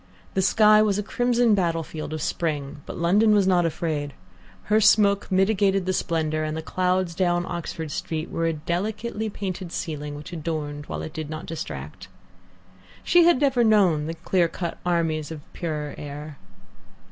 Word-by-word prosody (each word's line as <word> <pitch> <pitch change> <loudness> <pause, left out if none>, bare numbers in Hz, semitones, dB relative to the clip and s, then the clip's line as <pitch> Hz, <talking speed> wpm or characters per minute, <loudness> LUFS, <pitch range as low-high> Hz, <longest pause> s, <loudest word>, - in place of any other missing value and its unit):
The 190 - +1
sky 215 +3 +5
was 205 -2 +2
a 210 - -1
crimson 245 +1 +2
battlefield 165 -5 -1
of 155 -1 -3
spring, 145 -3 -2
but - - -6
London 205 +6 +4
was 200 -2 +4
not 180 -2 +3
afraid. 150 -3 -3 0.5
Her 215 +1 +2
smoke 205 -2 +4
mitigated 195 0 +2
the 185 - 0
splendour, 155 -3 -1
and 155 0 -3
the 160 - -5
clouds 185 0 0
down 175 0 +1
Oxford 165 -3 -5
Street 155 +2 -4
were 165 0 0
a 165 - +1
delicately 210 +8 -3
painted 190 -3 -5
ceiling, 150 -4 -4
which 150 +5 -9
adorned 150 -3 -4
while - - -4
it 155 - -7
did 155 -2 -5
not 155 0 -6
distract. 75 - -7 1.0
She 350 0 +5
has 345 -5 +5
never 270 -4 +3
known 190 -9 +3
the 165 - -4
clear 175 +1 +1
cut 170 0 -5
armies 165 -3 0
of 155 -3 -8
the - - -29
purer 150 -3 -4
air. 145 0 -8
170 Hz, 170 wpm, -24 LUFS, 155-200 Hz, 1.0 s, sky